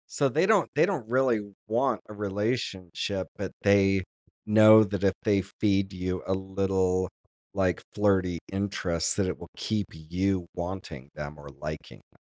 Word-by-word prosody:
So, 140 Hz, -, +1 dB
they 160 Hz, +7 st, +2 dB
don't 205 Hz, -3 st, +3 dB
they 150 Hz, -, +5 dB
don't 175 Hz, -, -3 dB
really 125 Hz, -1 st, +2 dB, 0.3 s
want 120 Hz, +5 st, +1 dB
a 105 Hz, -, -9 dB
relationship, 100 Hz, -2 st, -2 dB
but -, -, -4 dB
they 95 Hz, -1 st, +4 dB, 0.4 s
know 110 Hz, 0 st, +8 dB
that 100 Hz, -1 st, -3 dB
if 95 Hz, -1 st, +4 dB
they 100 Hz, -3 st, +3 dB
feed 100 Hz, 0 st, 0 dB
you 90 Hz, 0 st, -3 dB
a 95 Hz, -, +1 dB
little, 95 Hz, -1 st, 0 dB, 0.4 s
like, 95 Hz, -4 st, +1 dB
flirty 95 Hz, -4 st, +2 dB
interest 90 Hz, -4 st, 0 dB
that 100 Hz, -2 st, +1 dB
it 90 Hz, -, -3 dB
will -, -, -10 dB
keep 105 Hz, -4 st, -1 dB
you 90 Hz, +3 st, -2 dB
wanting 85 Hz, -6 st, -6 dB
them 75 Hz, 0 st, -7 dB
or 70 Hz, 0 st, -11 dB
liking 75 Hz, +3 st, -8 dB
them. -, -, -29 dB
95 Hz, 155 wpm, -27 LUFS, 90-105 Hz, 0.4 s, know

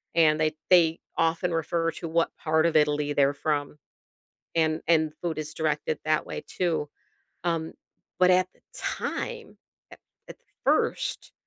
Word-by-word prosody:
and 155 Hz, -2 st, +4 dB
they 155 Hz, 0 st, +1 dB, 0.2 s
they 165 Hz, -2 st, +5 dB, 0.2 s
often 165 Hz, +2 st, +1 dB
refer 165 Hz, +1 st, 0 dB
to 165 Hz, -, -7 dB
what 165 Hz, +1 st, 0 dB
part 160 Hz, 0 st, +1 dB
of 170 Hz, -, +1 dB
Italy 150 Hz, -1 st, +2 dB
they're 140 Hz, -1 st, +3 dB
from. 145 Hz, 0 st, -2 dB, 0.8 s
And 160 Hz, -1 st, +1 dB
and 160 Hz, -2 st, +3 dB
food 170 Hz, -3 st, -2 dB
is 155 Hz, 0 st, -4 dB
directed 155 Hz, -1 st, -1 dB
that 155 Hz, 0 st, +1 dB
way -, -, -5 dB
too. 165 Hz, -5 st, -1 dB, 0.6 s
Um, 165 Hz, -2 st, -1 dB, 0.4 s
but 185 Hz, 0 st, +5 dB
at 185 Hz, 0 st, +4 dB
the -, -, -29 dB
time 475 Hz, -2 st, -4 dB, 0.3 s
at -, -, -13 dB, 0.3 s
at -, -, -9 dB, 0.3 s
first -, -, 0 dB
160 Hz, 145 wpm, -27 LUFS, 155-170 Hz, 0.8 s, they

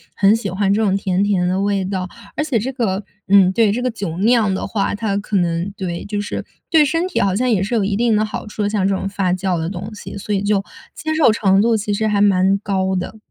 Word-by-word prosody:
很 200 Hz, +2 st, +4 dB
喜 215 Hz, -4 st, -3 dB
欢 195 Hz, +2 st, +1 dB
这 215 Hz, -, +1 dB
种 195 Hz, -2 st, +2 dB
甜 195 Hz, 0 st, 0 dB
甜 190 Hz, -3 st, +1 dB
的 185 Hz, +2 st, 0 dB
味 200 Hz, -1 st, 0 dB
道。 185 Hz, -1 st, -3 dB, 0.3 s
而 305 Hz, -, 0 dB
且 285 Hz, -6 st, 0 dB
这 250 Hz, +6 st, -3 dB
个 210 Hz, -6 st, -1 dB, 0.2 s
嗯， 190 Hz, -1 st, +6 dB
对， 220 Hz, 0 st, +3 dB
这 235 Hz, +4 st, -2 dB
个 255 Hz, -, 0 dB
酒 200 Hz, -7 st, -5 dB
酿 220 Hz, -1 st, +3 dB
的 190 Hz, -, -3 dB
话， 200 Hz, -3 st, -1 dB
它 205 Hz, -2 st, -1 dB
可 205 Hz, +1 st, -4 dB
能 170 Hz, +2 st, 0 dB
对， 175 Hz, -3 st, -4 dB
就 205 Hz, 0 st, -3 dB
是 205 Hz, -, -5 dB, 0.2 s
对 315 Hz, -2 st, +5 dB
身 330 Hz, +5 st, 0 dB
体 375 Hz, -, -2 dB
好 190 Hz, -1 st, +1 dB
像 250 Hz, +4 st, +1 dB
也 205 Hz, -5 st, +2 dB
是 210 Hz, +5 st, -2 dB
有 220 Hz, -, +2 dB
一 200 Hz, +1 st, 0 dB
定 230 Hz, +1 st, +2 dB
的 215 Hz, -, +2 dB
好 215 Hz, -, -6 dB
处 210 Hz, 0 st, -4 dB
的， 205 Hz, -, +1 dB
像 205 Hz, -2 st, +1 dB
这 195 Hz, -, +1 dB
种 195 Hz, -, -3 dB
发 195 Hz, -2 st, 0 dB
酵 185 Hz, -1 st, -1 dB
的 165 Hz, 0 st, -2 dB
东 200 Hz, +3 st, -6 dB
西。 205 Hz, -, -8 dB
所 205 Hz, +1 st, -4 dB
以 195 Hz, -, +1 dB
就 205 Hz, -1 st, +1 dB, 0.3 s
接 315 Hz, 0 st, -3 dB
受 315 Hz, -7 st, +5 dB
程 195 Hz, -2 st, +3 dB
度 230 Hz, +1 st, +3 dB
其 210 Hz, -1 st, -1 dB
实 220 Hz, +2 st, 0 dB
还 205 Hz, -1 st, +1 dB
蛮 195 Hz, -1 st, +3 dB
高 190 Hz, -2 st, -1 dB
的。 185 Hz, +4 st, -4 dB
200 Hz, 285 characters per minute, -19 LUFS, 190-215 Hz, 0.3 s, 嗯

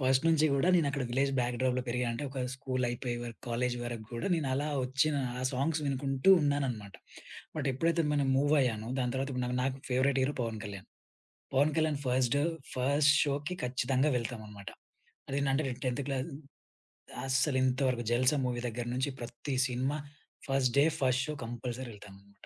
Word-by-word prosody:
First 130 Hz, +3 st, +3 dB
నుంచి 160 Hz, -1 st, +4 dB
గూడా, 140 Hz, +6 st, +2 dB
నేనక్కడ 140 Hz, -4 st, +1 dB
విలేజ్ 135 Hz, +3 st, +1 dB
బ్యాక్ 120 Hz, 0 st, -1 dB
డ్రోప్‌లో 125 Hz, -1 st, +1 dB
పెరిగా 125 Hz, +1 st, 0 dB
అంటే 115 Hz, -, -4 dB
ఒక 135 Hz, -, -6 dB, 0.2 s
స్కూలయిపోయే 125 Hz, -2 st, -2 dB
వరుకు, 115 Hz, -1 st, -8 dB
కాలేజీ 120 Hz, +1 st, 0 dB
వరకు 120 Hz, -2 st, -5 dB
గూడా 120 Hz, +10 st, -2 dB
నేనలా 140 Hz, -3 st, 0 dB, 0.2 s
ఒచ్చిన 140 Hz, +4 st, +1 dB, 0.3 s
ఆ -, -, -3 dB
సాంగ్స్ 145 Hz, +5 st, 0 dB
వినుకుంటూ 135 Hz, +4 st, +2 dB
ఉన్నాననమాట. 130 Hz, -9 st, -1 dB, 0.6 s
బట్ 140 Hz, -2 st, -1 dB
ఎప్పుడైతే 165 Hz, +5 st, +1 dB
మనం 140 Hz, -2 st, +1 dB
మూవయ్యానో, 135 Hz, -6 st, +2 dB
దాని 125 Hz, -2 st, 0 dB
తర్వాత 135 Hz, +1 st, -1 dB
ఇప్పుడు 125 Hz, -1 st, -1 dB
నాకు 125 Hz, 0 st, -1 dB
నాకు 135 Hz, 0 st, 0 dB
favourite 130 Hz, +1 st, +2 dB
hero 140 Hz, +3 st, 0 dB
Pawan 115 Hz, -2 st, -3 dB
Kalyan. 100 Hz, -2 st, -7 dB, 0.7 s
Pawan 145 Hz, +3 st, +4 dB
Kalyan 155 Hz, -2 st, +1 dB
first, 125 Hz, +1 st, +2 dB, 0.4 s
first 140 Hz, +4 st, +4 dB
షోకి 145 Hz, +4 st, -2 dB
ఖచ్చితంగా 130 Hz, +3 st, +1 dB
వెళ్తామనమాట. 110 Hz, -4 st, -5 dB, 0.6 s
అదేంటంటే 140 Hz, +1 st, +1 dB
నేను 125 Hz, -, -6 dB
10 125 Hz, +2 st, 0 dB
క్లాస్ 135 Hz, +2 st, -2 dB, 1.0 s
అస్సలింతవరకు 130 Hz, -2 st, +2 dB
'జల్సా' 130 Hz, +4 st, +3 dB
మూవీ 120 Hz, -1 st, -1 dB
దగ్గర 120 Hz, +1 st, -4 dB
నించి 130 Hz, +3 st, 0 dB
ప్రత్తి 120 Hz, +4 st, -5 dB
cinema 130 Hz, +3 st, -1 dB, 0.5 s
first 135 Hz, -2 st, +2 dB
day, 140 Hz, -, +7 dB, 0.2 s
first 130 Hz, 0 st, +3 dB
show 150 Hz, -, -2 dB
compulsory 120 Hz, +2 st, -5 dB
ఎళ్తాననమాట. 100 Hz, 0 st, -15 dB
130 Hz, 155 wpm, -31 LUFS, 120-140 Hz, 1.0 s, day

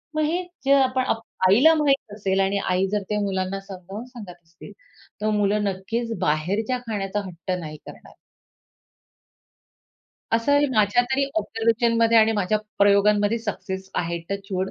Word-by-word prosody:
मग 310 Hz, -, +1 dB
हे 335 Hz, +4 st, 0 dB, 0.2 s
जे 275 Hz, -, +5 dB
आपण 260 Hz, -2 st, +3 dB
आप 225 Hz, -, 0 dB, 0.3 s
आईला 255 Hz, +12 st, +6 dB
माहित 275 Hz, -8 st, +1 dB
असेल 195 Hz, -2 st, -1 dB
आणि 195 Hz, +1 st, +1 dB
आई 185 Hz, +1 st, +1 dB
जर 210 Hz, -, 0 dB
त्या 210 Hz, -, 0 dB
मुलांना 190 Hz, -1 st, -2 dB
समजावून 195 Hz, +3 st, -9 dB
सांगत 235 Hz, -8 st, -10 dB
असतील, 165 Hz, +5 st, -14 dB, 0.5 s
तर 215 Hz, -, +1 dB
मुलं 210 Hz, 0 st, +1 dB
नक्कीच 225 Hz, +4 st, -3 dB
बाहेरच्या 200 Hz, +11 st, 0 dB
खाण्याचा 205 Hz, -2 st, -2 dB
हट्ट 180 Hz, 0 st, -7 dB
नाही 155 Hz, -2 st, -7 dB
करणार. -, -, -13 dB, 2.2 s
असंही 285 Hz, +6 st, +3 dB
माझ्या 215 Hz, +3 st, +3 dB
तरी 275 Hz, +1 st, +2 dB
ऑब्झर्वेशनमध्ये 230 Hz, -3 st, +2 dB
आणि 220 Hz, 0 st, +4 dB
माझ्या 210 Hz, 0 st, 0 dB, 0.2 s
प्रयोगांमध्ये 205 Hz, +2 st, +3 dB
सक्सेस 190 Hz, -3 st, -5 dB
आहे. 170 Hz, 0 st, -1 dB
Touch 200 Hz, 0 st, -4 dB
wood. 190 Hz, +1 st, -1 dB
210 Hz, 145 wpm, -23 LUFS, 190-230 Hz, 2.2 s, आईला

